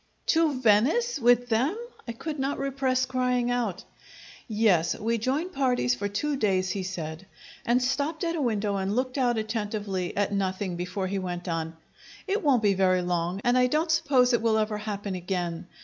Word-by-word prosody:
"To 320 Hz, -5 st, +2 dB
Venice 260 Hz, -, +3 dB
with 245 Hz, 0 st, +4 dB
them!" 260 Hz, -, +1 dB, 0.3 s
I 235 Hz, -, -3 dB
could 300 Hz, +5 st, -5 dB
not 275 Hz, +2 st, -1 dB
repress 265 Hz, -2 st, 0 dB
crying 250 Hz, -1 st, 0 dB
out. 230 Hz, -7 st, -1 dB, 0.6 s
"Yes; 210 Hz, -7 st, +2 dB
we 230 Hz, +2 st, -1 dB
join 275 Hz, +10 st, -1 dB
parties 250 Hz, -, +1 dB
for 165 Hz, +11 st, -2 dB
two 280 Hz, +9 st, -2 dB
days," 190 Hz, -5 st, +1 dB
he 200 Hz, -, -2 dB
said, 175 Hz, -1 st, -6 dB, 0.4 s
and 245 Hz, +2 st, +3 dB
stopped 290 Hz, +6 st, -1 dB
at 335 Hz, 0 st, 0 dB
a 315 Hz, -, -1 dB
window 210 Hz, -5 st, 0 dB
and 195 Hz, +2 st, -1 dB
looked 255 Hz, +2 st, -1 dB
out 240 Hz, -2 st, +2 dB
attentively 210 Hz, -4 st, -3 dB
at 205 Hz, 0 st, +1 dB
nothing 190 Hz, -1 st, -1 dB
before 180 Hz, +3 st, -3 dB
he 195 Hz, +1 st, -2 dB
went 180 Hz, -1 st, -5 dB
on: 165 Hz, -1 st, -3 dB, 0.5 s
"It 400 Hz, +2 st, 0 dB
won't 265 Hz, -7 st, +3 dB
be 205 Hz, -1 st, +4 dB
very 185 Hz, -1 st, +2 dB
long, 175 Hz, +2 st, -1 dB
and 245 Hz, +1 st, +3 dB
I 250 Hz, 0 st, +4 dB
don't 310 Hz, +5 st, +1 dB
suppose 255 Hz, -5 st, +3 dB
it 235 Hz, -, +2 dB
will 225 Hz, -1 st, +2 dB
ever 215 Hz, -1 st, 0 dB
happen 205 Hz, -2 st, -4 dB
again. 175 Hz, -2 st, -3 dB
220 Hz, 180 wpm, -27 LUFS, 190-255 Hz, 0.6 s, with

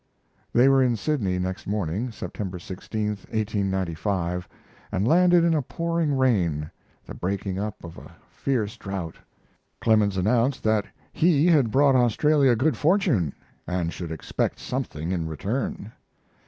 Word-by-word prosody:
They 125 Hz, +3 st, +5 dB
were 135 Hz, -1 st, +5 dB
in 125 Hz, -2 st, +3 dB
Sydney 110 Hz, -7 st, -1 dB
next 95 Hz, +1 st, -4 dB
morning, 100 Hz, +4 st, -2 dB
September 95 Hz, -3 st, -5 dB
16, 100 Hz, +4 st, -4 dB, 0.2 s
1895, 95 Hz, -4 st, -2 dB, 0.4 s
and 95 Hz, +4 st, 0 dB
landed 175 Hz, +2 st, +5 dB
in 170 Hz, -1 st, +3 dB
a 155 Hz, -, +2 dB
pouring 165 Hz, 0 st, -1 dB
rain, 85 Hz, -, +1 dB, 0.3 s
the -, -, -8 dB
breaking 95 Hz, +1 st, -3 dB
up 105 Hz, 0 st, -5 dB
of 85 Hz, -1 st, -9 dB
a -, -, -14 dB, 0.2 s
fierce 115 Hz, -7 st, -2 dB
drought. 95 Hz, -5 st, -5 dB, 0.6 s
Clemens 105 Hz, -3 st, +3 dB
announced 120 Hz, +7 st, +1 dB
that 110 Hz, -2 st, +1 dB, 0.3 s
he 160 Hz, -2 st, +3 dB
had 150 Hz, -9 st, +4 dB
brought 135 Hz, +3 st, +4 dB
Australia 130 Hz, +2 st, +4 dB
good 130 Hz, +2 st, +1 dB
fortune, 155 Hz, -, +2 dB, 0.4 s
and 90 Hz, -2 st, -1 dB
should 85 Hz, -3 st, -6 dB
expect 80 Hz, -, -2 dB
something 80 Hz, +4 st, -4 dB
in 85 Hz, -3 st, -1 dB
return. 100 Hz, -, -3 dB
105 Hz, 135 wpm, -25 LUFS, 95-135 Hz, 0.6 s, They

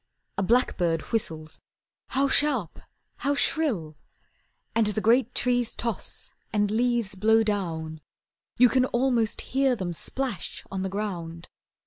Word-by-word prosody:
A 195 Hz, -, -1 dB
blackbird 180 Hz, -7 st, +2 dB
whistles, 160 Hz, -8 st, -3 dB, 0.5 s
how 275 Hz, +1 st, +1 dB
sharp, 270 Hz, -, +2 dB, 0.4 s
how 285 Hz, +1 st, 0 dB
shrill! 210 Hz, -, 0 dB, 0.8 s
And 225 Hz, -2 st, +3 dB
the 210 Hz, +1 st, 0 dB
great 235 Hz, +3 st, +3 dB
trees 245 Hz, -1 st, +1 dB
toss 230 Hz, -4 st, -3 dB, 0.2 s
And 205 Hz, -1 st, +1 dB
leaves 235 Hz, -2 st, +1 dB
blow 220 Hz, +3 st, +4 dB
down, 165 Hz, -7 st, -2 dB, 0.6 s
You 250 Hz, -, +8 dB
can 255 Hz, +2 st, +3 dB
almost 240 Hz, -3 st, +1 dB
hear 270 Hz, -1 st, +3 dB
them 185 Hz, -5 st, -3 dB
splash 255 Hz, +4 st, -4 dB
on 195 Hz, -1 st, -2 dB
the 190 Hz, -, -2 dB
ground. 175 Hz, -5 st, -5 dB
215 Hz, 125 wpm, -26 LUFS, 185-250 Hz, 0.8 s, You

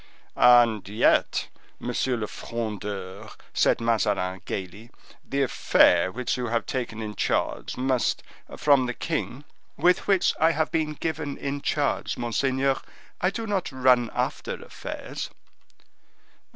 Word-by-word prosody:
"And 120 Hz, -5 st, +5 dB
yet, 105 Hz, +3 st, +2 dB, 0.3 s
Monsieur 125 Hz, +1 st, -1 dB
le 110 Hz, -, -2 dB
Frondeur," 105 Hz, -3 st, -5 dB, 0.2 s
said -, -, +3 dB
Mazarin, 105 Hz, -5 st, 0 dB
gayly, 100 Hz, +5 st, -6 dB, 0.3 s
"the 140 Hz, 0 st, 0 dB
affair 95 Hz, -7 st, +4 dB
which 125 Hz, +4 st, -2 dB
you 125 Hz, -1 st, -2 dB
have 115 Hz, 0 st, -1 dB
taken 115 Hz, -4 st, -3 dB
in 105 Hz, -1 st, -5 dB
charge -, -, -1 dB
must, 130 Hz, -1 st, 0 dB, 0.3 s
from 140 Hz, -4 st, +4 dB
the 125 Hz, -, -3 dB
king—" 145 Hz, -4 st, -3 dB, 0.3 s
"With 180 Hz, +1 st, +3 dB
which 195 Hz, -3 st, +3 dB
I 160 Hz, +1 st, +4 dB
have 160 Hz, 0 st, 0 dB
been 155 Hz, -2 st, 0 dB
given 150 Hz, -2 st, -3 dB
in 140 Hz, 0 st, -3 dB
charge, -, -, -1 dB
monseigneur. 130 Hz, +3 st, 0 dB, 0.4 s
I 180 Hz, -, +3 dB
do 225 Hz, +4 st, -4 dB
not 200 Hz, -6 st, -1 dB
run 125 Hz, -2 st, +3 dB
after -, -, -2 dB
affairs." -, -, -7 dB
125 Hz, 125 wpm, -26 LUFS, 110-140 Hz, 0.4 s, And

